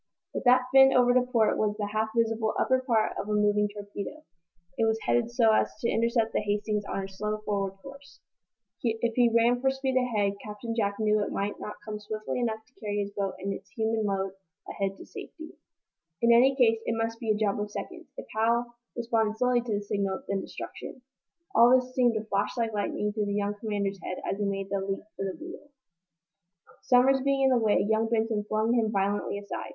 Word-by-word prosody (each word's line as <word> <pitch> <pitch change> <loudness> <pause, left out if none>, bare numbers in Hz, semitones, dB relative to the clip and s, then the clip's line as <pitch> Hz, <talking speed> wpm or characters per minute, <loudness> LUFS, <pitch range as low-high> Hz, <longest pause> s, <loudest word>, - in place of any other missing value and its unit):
But - - -4
that 250 +1 +6
fin 270 0 +8
over 245 -1 +5
to 255 - +5
port 240 -3 +1
was 210 -1 +1
the 210 - -2
half 215 +2 -1
visible 225 -1 +1
upper 260 0 +2
part 230 -4 +1
of 205 - -8
a - - 0
moving 210 0 +2
torpedo! 205 +8 -7 0.5
It 225 - +1
was 220 0 +2
headed 240 -1 +1
so 235 -2 +4
as - - +1
to 235 - +1
intercept 230 0 +1
the - - +2
"Hastings" 210 0 -1
on - - -4
her 195 0 -3
slow, 210 +2 -3
forward 195 -2 -1
course. 275 0 -13 0.6
If 230 0 0
he 240 0 +4
rang 235 +2 +3
for 265 - +3
speed 265 0 -2
ahead, 210 -6 +1
Captain 210 +2 -5
Jack 200 -3 0
knew 215 -1 +2
it - - -4
might 200 +1 -2
not 210 - -6
come 210 -1 -5
swiftly 215 +3 -4
enough 220 -2 -2
to 250 - -32
carry 205 -2 -3
his 200 0 -2
boat 200 -1 -3
and 195 +1 -3
its 195 0 -10
human 220 +2 -1
load 195 -2 -1 0.4
ahead 195 -1 -3
to - - -11
safety. 320 0 -10 0.7
In 235 0 +6
any 260 +3 +5
case, 225 -4 +4
it 230 - 0
must 225 0 -2
be 230 - -4
a 215 - +3
job 210 -1 0
of 210 - -3
seconds. - - -7
If - - -7
Hal 235 +2 +1 0.2
responded 225 -2 0
slowly 250 0 +2
to 235 -2 -3
the 205 - -2
signal 200 -2 -2
then 195 -1 -1
destruction! 255 - -8 0.5
All 235 +3 +7
this 255 0 -4
seemed 245 -3 +3
to 220 0 -2
flash 205 +2 -1
like 230 -2 -1
lightning 210 0 -1
through 210 -1 -1
the 200 - -1
young 205 0 0
commander's 200 -3 -2
head 185 - -5
as 195 - -2
he 205 - 0
made 195 -1 -3
that 200 -1 0
leap 195 - -2
for 195 - -3
the 190 - -4
wheel. 320 -3 -10 1.1
Somers 265 +2 +4
being 275 0 +2
in 265 - +5
the 255 -2 +4
way, 210 -2 +3
young 220 +1 +1
Benson 220 -2 0
flung 220 +2 +1
him 225 -3 +2
violently 200 0 0
aside. 110 - -6
220 Hz, 215 wpm, -28 LUFS, 205-240 Hz, 1.1 s, fin